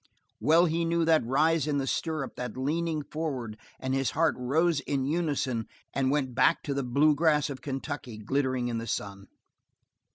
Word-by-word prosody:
Well 165 +3 +5
he 165 0 0
knew 165 0 +1
that 160 -1 +4
rise 155 +3 +2
in 145 -1 +1
the 135 - 0
stirrups, 155 0 -2
that 125 0 -5
leaning 155 +3 -1
forward, 135 -8 -4 0.2
and 130 0 -2
his 135 -1 +1
heart 165 0 +4
rose 155 +6 +1
in 140 -2 -2
unison 140 -7 -1 0.3
and 135 -1 +1
went 135 -3 0
back 130 +1 +3
to 140 - -2
the 140 - -1
blue 140 +5 +3
grass 150 -1 +2
of 130 -2 -7
Kentucky 135 -3 -5
glittering 130 +2 -1
in 115 -1 -2
the 115 - -6
sun. 100 -2 -4
140 Hz, 175 wpm, -28 LUFS, 130-155 Hz, 0.3 s, Well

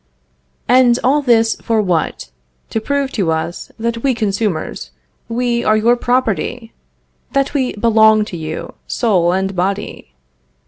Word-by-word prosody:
And 245 -1 +5
all 280 +4 +3
this 230 -4 +3
for 225 -2 0
what? 175 - -1 0.4
To 225 - -1
prove 280 +2 -1
to 190 -8 0
us, 160 +2 -3
that 230 0 -2
we 265 -1 +1
consumers, 205 - -2 0.4
we 235 0 0
are 215 - +3
your 235 +3 +3
property! 245 -1 -1 0.6
that 275 0 +1
we 265 -4 0
belong 220 -1 +4
to 195 - -8
you, 160 -1 -6
soul 185 -8 +1
and 190 +1 -1
body! 185 - -3
225 Hz, 135 wpm, -17 LUFS, 195-245 Hz, 0.6 s, And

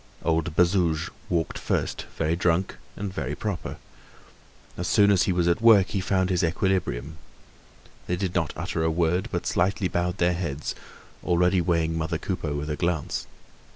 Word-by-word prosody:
Old 80 -2 0
Bazouge 85 -2 +2 0.2
walked 85 -2 -1
first, - - -2
very 80 +1 +1
drunk 90 +2 0 0.2
and 100 -2 -5
very - - -3
proper. 105 -5 -4 1.0
As 90 - -3
soon 105 -1 +5
as 95 -3 +4
he - - +4
was 90 -1 +1
at 85 +5 +2
work 110 -5 +6
he 100 - -1
found 95 0 +1
his 90 0 +1
equilibrium. 80 - -1 0.9
They 90 - 0
did 90 0 -2
not 85 -6 0
utter 80 - -2
a 80 - +2
word, 85 +2 +1
but - - -2
slightly 95 +2 +1
bowed 90 +1 -1
their 90 -1 +2
heads, 80 -4 -3 0.5
already 90 +1 +3
weighing 85 -1 +1
mother 80 0 -1
Coupeau 80 -4 -3
with 75 +1 -3
a - - -1
glance. 85 -2 -2
85 Hz, 165 wpm, -26 LUFS, 80-95 Hz, 1.0 s, work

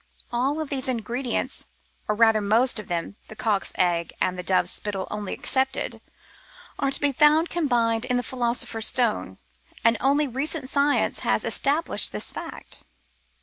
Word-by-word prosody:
All 280 +6 0
these 270 -2 -2
ingredients, 245 +1 -2 0.4
or 210 - +1
rather 225 -1 +4
most 225 +4 +2
of 210 - -8
them 175 +4 -3
— - - -35
the 215 - -11
cock's 220 -4 0
egg 170 -2 +1
and 185 - 0
the 180 - -4
dove's 185 +1 +1
spittle 200 -2 -3
only 210 -2 -4
excepted 265 0 -1 0.4
— - - -23
are 275 - +1
to 270 - +1
be 290 -1 +2
found 305 +4 +4
combined 240 -8 +1
in 250 -1 +1
the 245 - -1
Philo 240 -1 -1
sopher's 225 -2 +1
Stone, 240 -4 +1 0.5
and 230 0 +5
only 285 +3 +3
recent 270 +2 -2
science 285 +1 +2
has - - +1
established 295 +4 +1
this - - -3
fact. - - -8
245 Hz, 165 wpm, -25 LUFS, 215-275 Hz, 0.5 s, and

